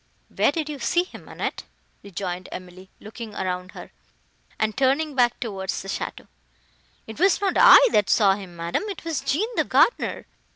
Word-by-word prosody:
"Where -, -, +3 dB
did 320 Hz, -3 st, -3 dB
you 295 Hz, -2 st, -6 dB
see 350 Hz, +5 st, +1 dB
him, 365 Hz, -, -13 dB
Annette?" -, -, -4 dB, 0.4 s
rejoined 185 Hz, -2 st, -6 dB
Emily, 185 Hz, +1 st, -10 dB
looking 220 Hz, 0 st, -9 dB
round 185 Hz, -1 st, -4 dB
her, -, -, -11 dB, 0.7 s
and 220 Hz, -1 st, -1 dB
turning 280 Hz, +3 st, +1 dB
back 245 Hz, -2 st, +2 dB
towards 195 Hz, -5 st, -4 dB
the -, -, -10 dB
château. -, -, -5 dB, 0.8 s
"It 220 Hz, +5 st, -10 dB
was 380 Hz, +1 st, +3 dB
not 400 Hz, -2 st, 0 dB
I -, -, +8 dB
that 205 Hz, -, +2 dB
saw 200 Hz, -3 st, +4 dB
him, 190 Hz, -3 st, -9 dB
madam, 170 Hz, 0 st, -2 dB
it 385 Hz, -4 st, -8 dB
was 325 Hz, -4 st, -2 dB
Jean 360 Hz, +11 st, 0 dB
the -, -, +3 dB
gardener. 480 Hz, -, +1 dB
220 Hz, 170 wpm, -24 LUFS, 190-300 Hz, 0.8 s, I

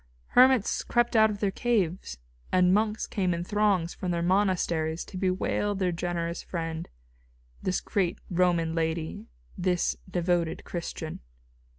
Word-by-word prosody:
Hermits 255 Hz, -3 st, +4 dB
crept 240 Hz, 0 st, +1 dB
out 220 Hz, 0 st, +6 dB
of 205 Hz, -1 st, -5 dB
their 200 Hz, -2 st, +1 dB
caves, 190 Hz, -, -1 dB, 0.3 s
and 180 Hz, 0 st, +4 dB
monks 215 Hz, +1 st, +1 dB
came 185 Hz, -4 st, 0 dB
in 170 Hz, -, -3 dB
throngs 195 Hz, -3 st, +1 dB
from 185 Hz, -, -4 dB
their 170 Hz, -1 st, 0 dB
monasteries 175 Hz, -4 st, +1 dB
to -, -, -12 dB
bewail 190 Hz, +2 st, 0 dB
their 185 Hz, -2 st, 0 dB
generous 170 Hz, 0 st, -3 dB
friend, 165 Hz, -2 st, -4 dB, 0.7 s
this 185 Hz, -, 0 dB
great 190 Hz, -5 st, 0 dB
Roman 170 Hz, -2 st, +1 dB
lady, 160 Hz, -1 st, -2 dB, 0.3 s
this 180 Hz, -1 st, 0 dB
devoted 175 Hz, -2 st, 0 dB
Christian. 165 Hz, -2 st, -5 dB
180 Hz, 130 wpm, -28 LUFS, 170-200 Hz, 0.7 s, out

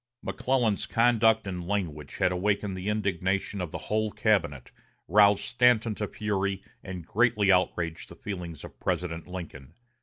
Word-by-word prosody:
McClellan's 125 Hz, -6 st, 0 dB
conduct 115 Hz, -2 st, +3 dB
and 90 Hz, -3 st, -5 dB
language 80 Hz, -8 st, -3 dB
had 90 Hz, -, +2 dB
awakened 100 Hz, +1 st, 0 dB
the 95 Hz, +2 st, -3 dB
indignation 100 Hz, -1 st, -1 dB
of 90 Hz, -, -3 dB
the -, -, -5 dB
whole 110 Hz, 0 st, -1 dB
cabinet, 85 Hz, -, 0 dB, 0.4 s
roused 105 Hz, -1 st, +5 dB
Stanton 120 Hz, -3 st, +3 dB
to 105 Hz, 0 st, -3 dB
fury, 100 Hz, -2 st, -2 dB, 0.2 s
and 90 Hz, -3 st, -7 dB
greatly 110 Hz, -2 st, +3 dB
outraged 85 Hz, -3 st, 0 dB
the -, -, -11 dB
feelings 90 Hz, -6 st, -6 dB
of -, -, -11 dB
President 85 Hz, -2 st, -2 dB
Lincoln. 85 Hz, -5 st, -8 dB
100 Hz, 145 wpm, -28 LUFS, 90-105 Hz, 0.4 s, roused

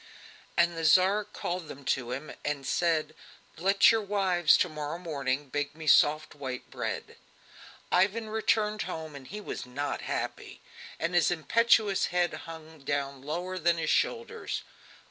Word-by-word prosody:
And 170 Hz, 0 st, +3 dB
the 165 Hz, -, -4 dB
Tsar 190 Hz, +6 st, +5 dB
called 180 Hz, -4 st, -4 dB
them 140 Hz, -1 st, -10 dB
to 125 Hz, -2 st, 0 dB
him 135 Hz, +5 st, -5 dB
and 145 Hz, -2 st, -2 dB
said: 165 Hz, -1 st, +1 dB, 0.4 s
"Let 195 Hz, +5 st, +5 dB
your 225 Hz, -1 st, +2 dB
wives, 190 Hz, -5 st, +3 dB
to -, -, +2 dB
morrow 155 Hz, 0 st, -5 dB
morning, 145 Hz, -5 st, -2 dB
bake 145 Hz, +2 st, -2 dB
me 160 Hz, 0 st, -8 dB
soft 155 Hz, +1 st, +4 dB
white 130 Hz, -3 st, -6 dB
bread." -, -, -4 dB, 0.7 s
Ivan 205 Hz, +5 st, +2 dB
returned 215 Hz, -1 st, +1 dB
home, 160 Hz, -2 st, -5 dB
and 135 Hz, -2 st, -10 dB
he 210 Hz, -, -6 dB
was 205 Hz, -, -6 dB
not 140 Hz, +3 st, -3 dB
happy, -, -, -4 dB, 0.4 s
and 170 Hz, +2 st, -1 dB
his 175 Hz, -1 st, +4 dB
impetuous 205 Hz, +4 st, +3 dB
head 175 Hz, -1 st, +1 dB
hung 160 Hz, -1 st, -9 dB
down 140 Hz, -1 st, -3 dB
lower 175 Hz, +6 st, -4 dB
than 170 Hz, 0 st, +2 dB
his 160 Hz, -1 st, 0 dB
shoulders. 460 Hz, -1 st, -1 dB
165 Hz, 150 wpm, -29 LUFS, 145-190 Hz, 0.7 s, Tsar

